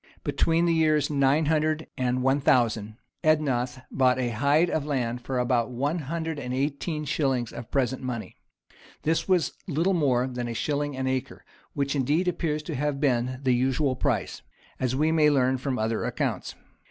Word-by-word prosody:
[] -, -, -29 dB
Between 165 Hz, +1 st, +1 dB
the 170 Hz, -, +3 dB
years 155 Hz, -2 st, +2 dB
900 155 Hz, +3 st, +2 dB
and 125 Hz, 0 st, 0 dB
1000, 125 Hz, -6 st, +2 dB, 0.3 s
Ednoth 130 Hz, -5 st, +1 dB
bought 130 Hz, -1 st, +3 dB
a 125 Hz, -2 st, 0 dB
hide 140 Hz, +9 st, +3 dB
of 155 Hz, -, 0 dB
land 125 Hz, -5 st, -2 dB
for 130 Hz, +1 st, -3 dB
about 120 Hz, -1 st, +1 dB
one 140 Hz, +7 st, -1 dB
hundred 160 Hz, +1 st, -3 dB
and 125 Hz, -2 st, -4 dB
eighteen 150 Hz, +3 st, -2 dB
shillings 135 Hz, -5 st, 0 dB
of 120 Hz, -, -8 dB
present 130 Hz, -2 st, 0 dB
money.[] 125 Hz, -4 st, -5 dB, 0.7 s
This 160 Hz, +1 st, 0 dB
was 185 Hz, -3 st, +2 dB
little 170 Hz, +4 st, +1 dB
more 130 Hz, -7 st, +2 dB
than 125 Hz, -2 st, -4 dB
a 115 Hz, -, -4 dB
shilling 145 Hz, +1 st, -1 dB
an 130 Hz, -, -2 dB
acre, 130 Hz, -1 st, -3 dB, 0.3 s
which 140 Hz, 0 st, -1 dB
indeed 145 Hz, +7 st, +1 dB
appears 160 Hz, -3 st, -1 dB
to 160 Hz, -, -5 dB
have 145 Hz, 0 st, -1 dB
been 130 Hz, -2 st, 0 dB
the 130 Hz, -2 st, +3 dB
usual 130 Hz, +2 st, +1 dB
price, 125 Hz, -7 st, -1 dB, 0.4 s
as 130 Hz, 0 st, 0 dB
we 155 Hz, +3 st, +2 dB
may 155 Hz, -2 st, +4 dB
learn 130 Hz, -2 st, +2 dB
from 130 Hz, -1 st, -2 dB
other 110 Hz, 0 st, -1 dB
accounts. -, -, -2 dB
135 Hz, 170 wpm, -26 LUFS, 125-155 Hz, 0.7 s, may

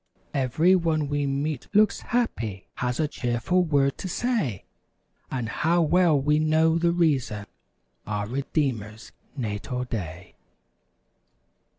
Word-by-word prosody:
Every 150 Hz, +8 st, +3 dB
one 160 Hz, -4 st, 0 dB
we 145 Hz, -1 st, 0 dB
meet 140 Hz, 0 st, -2 dB
looks 210 Hz, 0 st, +4 dB
happy; 115 Hz, -, -2 dB
Has 125 Hz, +2 st, -2 dB
a 155 Hz, -, +2 dB
cheerful 125 Hz, +8 st, 0 dB
word 140 Hz, -4 st, +1 dB
to 190 Hz, -, -4 dB
say. 185 Hz, -, -1 dB, 0.6 s
And 125 Hz, -3 st, -3 dB
how 165 Hz, +9 st, +2 dB
well 165 Hz, -2 st, +4 dB
we 150 Hz, +2 st, +2 dB
know 160 Hz, +1 st, +3 dB
the 170 Hz, 0 st, +3 dB
reason— 135 Hz, -12 st, +1 dB, 0.6 s
Our 105 Hz, -1 st, -2 dB
Redeemer's 120 Hz, -4 st, -2 dB, 0.3 s
natal 125 Hz, +2 st, -3 dB
day! 90 Hz, -7 st, -6 dB
140 Hz, 115 wpm, -26 LUFS, 120-165 Hz, 0.6 s, looks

